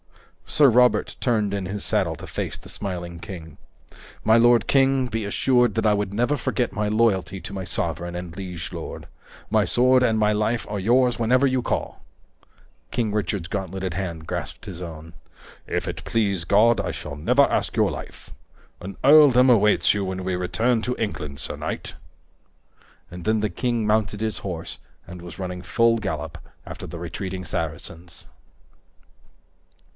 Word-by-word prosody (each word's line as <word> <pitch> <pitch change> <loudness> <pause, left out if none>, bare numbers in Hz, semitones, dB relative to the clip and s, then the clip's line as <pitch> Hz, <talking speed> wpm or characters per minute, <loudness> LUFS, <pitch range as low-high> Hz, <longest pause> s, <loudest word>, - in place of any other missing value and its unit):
Sir 145 -2 +5
Robert 125 +1 +3
turned 105 -5 +1
in 100 -2 -2
his 100 +2 -4
saddle - - +1
to - - -9
face - - -4
the - - -14
smiling 90 -4 -5
king. 80 -5 -9 0.7
"My 110 - +5
lord 120 0 +5
king, 135 -1 +3
be 115 -2 -3
assured 120 +2 +2
that 110 - 0
I 105 - +5
would 100 -1 -1
never 120 +7 +1
forget 125 -3 -1
my 105 0 -1
loyalty 100 -5 +1
to 100 - -8
my 95 -1 -4
sovereign 85 0 -3
and 90 -1 -6
liege 90 -4 -5
lord. - - -7 0.4
My - - +3
sword 130 +1 +4
and 110 -3 +2
my 105 0 +3
life 110 +3 0
are 105 -1 -3
yours 120 +4 +3
whenever 125 +4 +3
you 130 -1 +1
call." - - -3 0.9
King 110 - -1
Richard's 100 -4 -2
gauntleted 95 -1 -4
hand 85 -4 -5
grasped - - -5
his 90 -2 -7
own. 80 -1 -8 0.5
"If - - -2
it - - -5
please 100 -6 0
God, 110 +6 +4
I - - -3
shall 70 - -7
never 125 - +3
ask - - 0
your - - +3
life. - - -9 0.5
An 95 +1 -8
earldom 135 -3 +7
awaits 105 -3 +4
you 105 -1 -1
when 95 0 -4
we 95 -1 0
return 110 +6 0
to 125 +2 -2
England, 75 -10 -4
sir 70 - -5
knight." - - -5 1.2
And 90 0 -9
then 110 0 +1
the 105 -1 -1
king 120 +3 -1
mounted 105 -1 +1
his 110 0 -2
horse 85 -4 -6 0.3
and 90 0 -9
was 85 +2 -10
running 90 -1 -4
full 115 +4 +2
gallop 80 -6 -4 0.3
after - - -8
the 85 - -7
retreating 90 +2 -5
Saracens. 80 +1 -6
105 Hz, 165 wpm, -24 LUFS, 90-115 Hz, 1.2 s, earldom